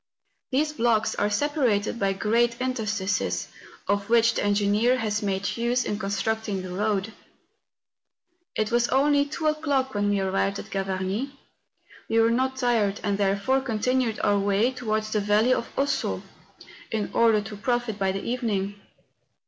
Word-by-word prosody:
These 300 +3 +1
blocks 230 -4 +1
are 205 - 0
separated 235 -3 0
by 195 -1 +1
great 235 +4 +1
inter¬ 255 -3 -2
stices, 205 -1 -1 0.4
of 200 0 0
which 230 0 +4
the - - -1
engineer 205 +4 +2
has 210 -3 -1
made 195 -1 -1
use 240 +1 0
in 210 - -2
con¬ 195 - -3
structing 210 -1 -2
the 185 -1 -6
road. 210 +1 -1 1.4
It 215 0 -1
was 240 0 +3
only 285 +2 +3
two 310 +2 -5
o'clock 290 -4 0
when 205 0 0
we 205 -1 +1
arrived 195 +1 0
at 215 - -9
Ga 195 -1 -1
varnie. 195 +9 -3 0.7
We 225 - +3
were 225 0 +4
not 260 +2 0
tired 230 -6 +1
and 200 0 0
therefore 200 +7 +1
continued 250 -1 0
our 205 0 +3
way 200 +5 +2
towards 215 -4 -2
the 215 - +1
Valley 210 +5 +3
of 235 - -2
Ossau, 280 +1 -1 0.7
in 215 -2 -2
order 225 -2 +4
to 210 +1 -8
profit 240 0 -1
by 195 -1 +1
the 195 +1 -4
evening. 205 -5 -2
220 Hz, 160 wpm, -25 LUFS, 200-250 Hz, 1.4 s, which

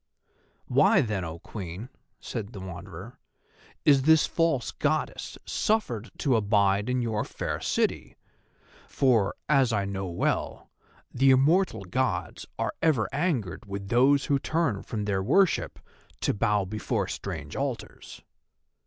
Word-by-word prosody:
"Why - - +4
then, 105 -5 -2
O 80 -1 -5
Queen," 95 +5 -7 0.3
said 110 -2 -6
the 100 - -7
Wanderer, 95 +4 -9 0.7
"is 140 -2 +6
this 160 +3 +5
false 165 -8 0
Goddess - - -2
suffered 125 - -1
to 135 -4 +2
abide 100 -1 +2
in 125 -1 0
your 110 -2 -1
fair - - -4
city? - - -1 0.7
for, 115 -7 +2
as 135 -4 +3
I 100 -3 0
know 95 -1 -4
well, 85 -1 -2 0.4
the 135 +2 +4
immortal 145 - +3
Gods 130 +8 -2
are - - -1
ever 130 -11 +2
angered 135 - -1
with 100 0 -6
those 135 +4 +4
who 140 -1 +2
turn 155 -10 0
from 105 -3 -4
their 100 -2 0
worship 190 - +2 0.4
to - - +1
bow 105 -2 +1
before 105 0 -2
strange 80 -6 -6
altars." 135 -3 -5
110 Hz, 130 wpm, -27 LUFS, 100-135 Hz, 0.7 s, is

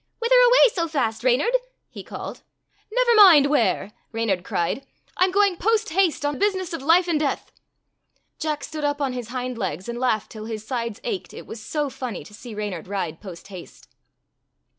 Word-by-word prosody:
"Whither 470 +1 +1
away - - +6
so 335 -3 -1
fast, 230 -8 -1
Reynard?" 260 - +3 0.3
he - - -10
called. - - -8 0.5
"Never - - +3
mind 365 -10 +8
where," 210 -7 +1 0.2
Reynard 220 -6 -1
cried. 175 +10 -2 0.2
" - - -35
I 365 - +5
'm - - 0
going 400 -2 +3
post 445 +3 +1
haste 340 -3 +1
on 290 -1 -1
business 380 -4 0
of 330 - -4
life 335 +5 +4
and 325 -3 +1
death." 290 -2 -2 0.9
Jack 305 -1 -2
stood 310 -1 -6
up 290 0 0
on 275 -3 -1
his 245 -3 -5
hind 250 0 -4
legs, 185 -1 -3
and 235 0 -4
laughed 235 -5 0
till 215 -1 -8
his 220 -1 -6
sides 235 -3 -3
ached, 435 -6 -4
it - - -9
was 225 - -9
so 295 +6 -2
funny 250 -4 -5
*to 210 - -15
see 225 +1 -10
Reynard 205 -6 -5
ride 180 -5 -4
post 185 -2 -10
haste. 185 -3 -12
270 Hz, 190 wpm, -23 LUFS, 220-360 Hz, 0.9 s, mind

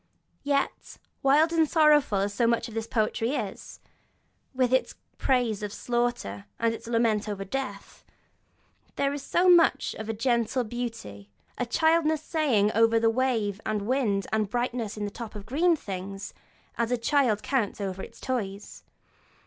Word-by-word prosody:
Yet, 280 -1 -2 0.2
wild 300 +4 +4
and 320 -2 +3
sorrowful 300 - +4
as 200 +1 -1
so 235 +2 +2
much 235 0 +1
of 230 - -10
this 225 0 -3
poetry 225 +3 0
is, - - -6 0.7
with 255 -1 +1
its 260 - +1 0.2
praise 245 -6 +1
of 210 -1 -4
slaughter 240 - -2
and 230 0 +1
its 230 - -9
lament 230 -2 +1
over 195 -1 -4
death, 200 -3 -6 0.9
there 280 0 0
is 285 -1 -7
much 350 -1 +4
also - - -11
of 220 - -7
a - - 0
gentle 235 +2 0
beauty, 225 - -6 0.3
a 245 - -3
childlike 320 +3 +2
saying 280 -10 +1
over 225 +1 +4
of 225 - 0
wind 240 -5 +1
and 215 -2 -2
wave 215 -5 0
and 215 -1 +2
the - - -14
brightness 240 -2 -2
in 210 - -2
the 205 - -5
tops 225 0 -8
of 205 -1 -8
green 330 +8 +2
things, 195 -5 -6 0.5
as 235 -1 +1
a 245 - +2
child 235 -3 +1
counts 245 -8 -1
over 190 -1 -4
its - - -10
toys. 205 -6 -4
235 Hz, 165 wpm, -27 LUFS, 210-270 Hz, 0.9 s, wild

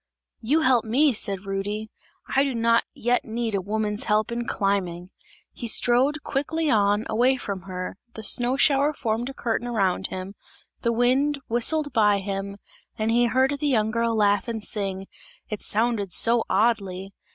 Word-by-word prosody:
"You 285 +8 +1
help 255 -5 +3
me," 265 +6 +3
said 200 -2 -3
Rudy, 205 +2 -4 0.4
"I 270 - +5
do 275 -3 -2
not 230 0 +2
yet 245 +1 0
need 230 0 -3
a 195 - 0
woman's 210 +2 -2
help 215 +1 +1
in 235 0 -3
climbing!" 185 -3 -2 0.4
He 235 - -6
strode 260 +7 +3
quickly 300 +2 -1
on, 205 0 +2
away 250 +4 +2
from 200 -6 -5
her; 185 +2 -6 0.2
the 220 - -7
snow 245 +5 +3
shower 285 +1 +3
formed 235 -2 -2
a - - -7
curtain 235 +1 -2
around 195 -5 0
him, 185 +1 -7 0.5
the 235 - +1
wind 260 +5 +1
whistled 290 +5 +1
by 210 -3 +4
him 195 0 -5 0.4
and 220 +1 0
he 240 +1 +3
heard 260 +3 +2
the 295 - 0
young 220 -5 +1
girl 230 0 0
laugh 205 -1 +2
and 225 -2 -4
sing; 195 -3 -2 0.4
it 210 - -5
sounded 215 -3 0
so 230 +4 +4
oddly! 195 -3 0
225 Hz, 165 wpm, -24 LUFS, 200-245 Hz, 0.5 s, I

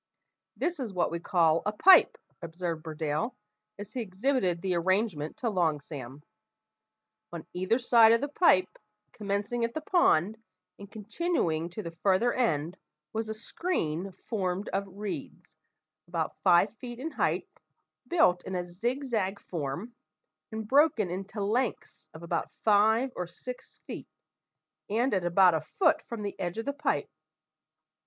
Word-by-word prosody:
"This 345 -2 -1
is 245 -6 -3
what 175 - +1
we 170 - -2
call 165 -2 +2
a 210 - 0
pipe," 360 - +6 0.2
observed 170 -1 -4
Burdale, 155 - -2 0.4
as 205 +1 -9
he 255 - -2
exhibited 195 -3 0
the 190 -1 0
arrangement 175 -3 0
to 240 - -1
Long 165 -6 +1
Sam. 140 -1 -9 1.1
On 170 -2 -7
either 185 +6 +1
side 235 -3 +6
of 230 - +5
the 285 - -2
pipe, 280 - +3 0.3
commencing 205 +3 -2
at 230 0 -2
the 315 - -2
pond, 220 - +2 0.4
and 200 -1 -10
continuing 215 - -1
to 190 +5 -7
the 170 - -6
farther 205 +5 +3
end, 175 - 0 0.4
was 220 0 -2
a 220 - -3
screen 195 - -3
formed 195 -3 -2
of 195 +1 -2
reeds, 180 -4 -7 0.5
about 170 -2 -2
five 190 +3 +4
feet 240 -1 -8
in 305 +6 -5
height, - - -2 0.5
built 250 - +3
in 190 - -5
a 180 - -1
zig 235 +11 -3
zag 205 -6 -1
form, 170 - -5 0.6
and 220 -1 -5
broken 270 - +3
into 195 +3 -4
lengths 230 +4 -2
of 160 - -10
about 170 - -2
five 220 +4 +4
or 180 - -3
six 250 +8 -9
feet, - - -7 0.8
and 235 +5 +1
at 185 -3 0
about 180 +1 +5
a 160 - 0
foot 320 -4 +2
from 230 -4 -5
the 200 - -4
edge 175 +2 -3
of 225 - -3
the 280 - -1
pipe. 290 +1 -1
200 Hz, 150 wpm, -29 LUFS, 175-235 Hz, 1.1 s, pipe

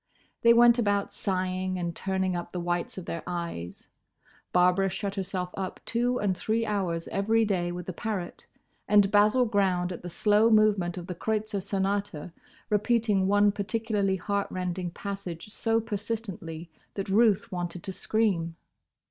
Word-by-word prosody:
They 235 - +6
went 235 +1 +6
about 205 -3 +1
sighing 185 -1 -1
and 170 -2 -3
turning 190 -1 -1
up 175 0 -5
the 180 - -2
whites 175 +1 -2
of 185 - -6
their 165 - -4
eyes; 170 - -5 0.6
Barbara 180 +2 +3
shut 195 +1 -3
herself 185 -2 -3
up 190 -1 -4
two 245 +2 +1
and 200 -4 0
three 220 +5 0
hours 185 -6 -1
every 220 +3 +2
day 180 -4 0
with 175 0 -6
the 185 - -5
parrot, 190 -2 -5 0.4
and 205 -1 +5
Basil 215 +5 +5
ground 190 -5 +1
at 180 - -6
the 175 - -6
slow 210 +5 +3
movement 205 -5 +3
of 175 - -5
the 180 - -5
Kreutzer 215 +2 -2
Sonata, 195 -4 -2 0.4
repeating 210 -2 +2
one 205 +1 +4
particularly 205 -1 -1
heart 200 +2 -1
rending 180 -1 -3
passage 195 -1 -6
so 225 +1 +1
persistently 205 -7 -5 0.2
that 195 - -3
Ruth 205 0 +3
wanted 175 -1 -4
to 190 - -4
scream. 185 -7 0
195 Hz, 155 wpm, -28 LUFS, 180-210 Hz, 0.6 s, They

